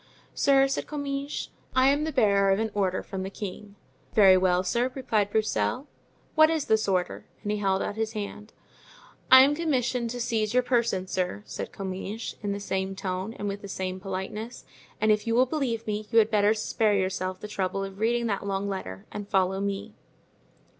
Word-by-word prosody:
"Sir," 275 -1 +4
said 270 - -3
Comminges, 285 -1 -4 0.3
"I 260 +1 +5
am 290 +2 +2
the 315 - -2
bearer 200 -7 +3
of 195 - +4
an 220 0 -1
order 190 -2 0
from 190 -1 -5
the 190 - -4
king." 200 0 -7 0.4
"Very 195 -3 +8
well, 185 -1 +3
sir," 240 +6 0
replied 220 -6 0
Broussel, 215 - 0 0.5
"what 315 0 +6
is 320 -3 0
this 220 0 +2
order?" 180 -2 -1 0.2
And 210 - -1
he 210 - -1
held 195 -1 +1
out 205 - -4
his 220 0 -2
hand. 210 0 -6 0.8
"I 260 0 +10
am 280 +2 +3
commissioned 255 -6 0
to 245 +1 -5
seize 225 -2 -1
your 250 - +4
person, 235 -7 +1
sir," 185 +2 -2
said - - -6
Comminges, 195 +3 -5
in 205 -1 -2
the 200 - -3
same 190 -1 -2
tone 190 +2 -3
and 205 - -4
with 200 0 -4
the 200 - -8
same 185 -1 -4
politeness; 195 +5 -5 0.3
"and 215 0 +3
if 210 +2 +1
you 230 - +1
will 255 +2 +5
believe 250 -5 -2
me 210 0 -3
you 230 - +1
had 220 0 +5
better 210 0 +4
spare 215 -1 +1
yourself 185 -1 -1
the 210 - -7
trouble 195 -1 -2
of 195 0 -7
reading 235 +2 +1
that 200 -4 -1
long 195 0 -1
letter 100 - -5
and 205 -1 -6
follow 190 0 +1
me." 200 -1 -3
210 Hz, 195 wpm, -27 LUFS, 195-235 Hz, 0.8 s, I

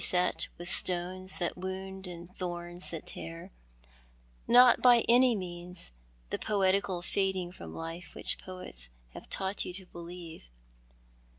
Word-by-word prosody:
et 180 0 +2
with 175 - -6
stones 185 +1 +1
that 175 - -1
wound 190 +1 -5
and 175 +1 -9
thorns 175 0 -3
that 165 -2 -6
tear— 85 0 -8 1.0
not 245 +1 +8
by 245 -2 +7
any 245 0 +6
means 175 - -5 0.4
the - - -1
poetical 195 -3 +1
fading 190 -2 0
from 85 - -9
life 165 +2 -7
which - - +2
poets 180 - -7 0.2
have - - -10
taught 190 +1 +1
you - - -5
to 190 +1 -6
believe. 170 - -9
180 Hz, 130 wpm, -31 LUFS, 175-190 Hz, 1.0 s, not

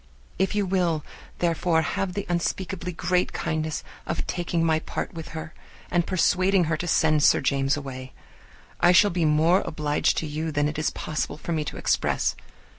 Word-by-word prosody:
If 190 +2 +1
you 205 -1 +1
will, 175 -5 0 0.3
therefore, 170 -1 +1
have 180 +5 -2
the 200 +1 -3
unspeakably 180 +1 -2
great 180 +1 0
kindness 155 0 -2 0.2
of - - -2
taking 175 -1 -1
my 160 -1 +3
part - - -5
with 165 -1 -7
her, 160 +1 -7 0.4
and 175 -2 +1
persuading 185 +1 +3
her 155 -1 0
to 175 - -4
send 155 -2 +3
Sir - - +5
James 135 +1 +1
away, 130 -2 -7 0.7
I 175 - +5
shall 205 +3 +6
be 170 -2 0
more 160 +5 +4
obliged 150 -1 0
to - - -1
you 155 +2 -3
than 145 0 +1
it 150 0 -3
is 155 - +1
possible 155 -1 -3
for 170 - -6
me 155 -2 0
to - - -6
express. - - +1
165 Hz, 180 wpm, -25 LUFS, 155-180 Hz, 0.7 s, shall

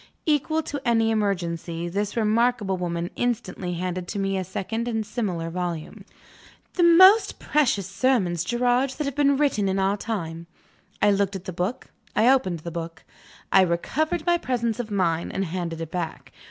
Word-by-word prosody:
Equal 315 +1 +1
to 290 -2 -5
any 225 -2 +2
emergency, 175 -5 -2
this 200 +5 -3
remarkable 220 -2 +2
woman 175 -1 -3
instantly 195 -7 -2
handed 180 0 -3
to - - -5
me 195 0 0
a 190 - -1
second 220 +6 -4
and 225 -2 -1
similar 190 -7 -3
volume. 175 -3 -5 0.7
"The 360 - 0
most 375 +5 +7
precious 260 -10 +1
sermons, 195 -4 +1
Gerard, 245 +4 +1
that 300 - -1
have 280 - -2
been 280 0 +3
written 255 -9 +1
in 190 - 0
our 195 +1 +1
time." 170 -7 -4 0.6
I 205 - +6
looked 200 0 +1
at 190 -1 -7
the 185 - -5
book; 185 +8 -3 0.2
I 225 - +4
opened 185 -11 -1
the 170 - -6
book; 165 0 -6 0.5
I 190 - +7
recovered 295 - 0
my 345 -1 +3
presence 235 -4 -1
of 235 -2 -4
mind, 170 -5 0
and 195 - -1
handed 170 -1 -4
it 165 -1 -6
back. 175 -3 -5
200 Hz, 170 wpm, -24 LUFS, 175-245 Hz, 0.7 s, most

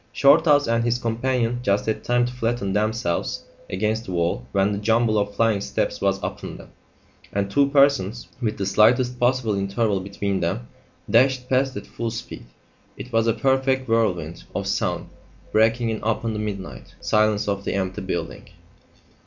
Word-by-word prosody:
Shorthouse 145 0 +5
and 115 0 +1
his 120 0 +1
companion 120 0 -1
just 100 -4 +1
had 110 - -2
time 120 0 +2
to 125 - -5
flatten 115 -5 -1
themselves 105 -4 -1 0.3
against 110 +4 -1
the 95 - -6
wall 85 -8 -1
when 100 +1 +2
the 100 - -2
jumble 110 0 +2
of 100 0 -2
flying 110 -3 +2
steps - - -2
was 100 -1 +2
upon - - -5
them, - - -14 0.6
and 100 0 -2
two 140 +3 +4
persons, 140 -6 +2
with 110 -3 -1
the 100 - -2
slightest 120 +5 +3
possible 125 -3 +2
interval 100 +1 0
between 100 0 -3
them, - - -2 0.4
dashed 125 +1 +3
past 130 0 +1
at - - -7
full 115 -1 -4
speed. 115 - -8 0.5
It 125 - -9
was 115 0 +2
a 115 - +3
perfect 130 0 +1
whirlwind 90 -8 0
of - - -2
sound - - -1 0.4
breaking 115 +2 +2
in 110 - -4
upon 115 +1 -1
the 105 - -3
midnight 95 - -6
silence 105 -1 +1
of 100 -1 -1
the - - -2
empty 95 -1 -2
building. 90 -3 -5
110 Hz, 170 wpm, -23 LUFS, 100-120 Hz, 0.6 s, Shorthouse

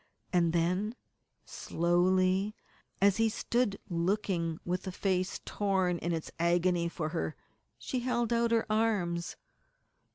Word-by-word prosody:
And 170 -2 +3
then, 180 +7 0 0.5
slowly, 185 +4 +1 0.5
as 200 -1 +5
he 225 0 +3
stood 225 -1 0
looking 170 -2 -1
with 180 +2 -2
a - - -2
face 185 -1 -1
torn 190 -4 0
in 175 - -2
its 165 -2 -3
agony 170 0 +2
for 155 -2 -3
her, 80 - -3 0.4
she 255 - -3
held 240 -1 0
out 235 0 +2
her 230 -1 +2
arms. 205 -6 0
185 Hz, 125 wpm, -31 LUFS, 170-210 Hz, 0.5 s, as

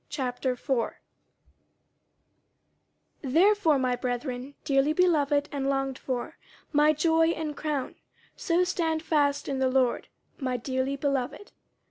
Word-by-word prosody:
50:004:001 255 -1 -2 2.3
Therefore, 330 +3 +3
my 255 -1 +1
brethren 250 +2 -4
dearly 275 +2 +2
beloved 295 -5 +2
and 275 -1 -2
longed 270 -1 -1
for, 260 +5 -4 0.3
my 295 +1 +5
joy 325 +2 +3
and 320 -3 -2
crown, 295 -4 -3 0.4
so 350 0 +1
stand 330 -3 -1
fast 290 -3 +1
in 275 -1 -2
the 260 -1 +2
Lord, 255 -2 +1 0.3
my 255 -3 -1
dearly 260 +2 -2
beloved. 275 +6 -2
280 Hz, 110 wpm, -27 LUFS, 260-315 Hz, 2.3 s, my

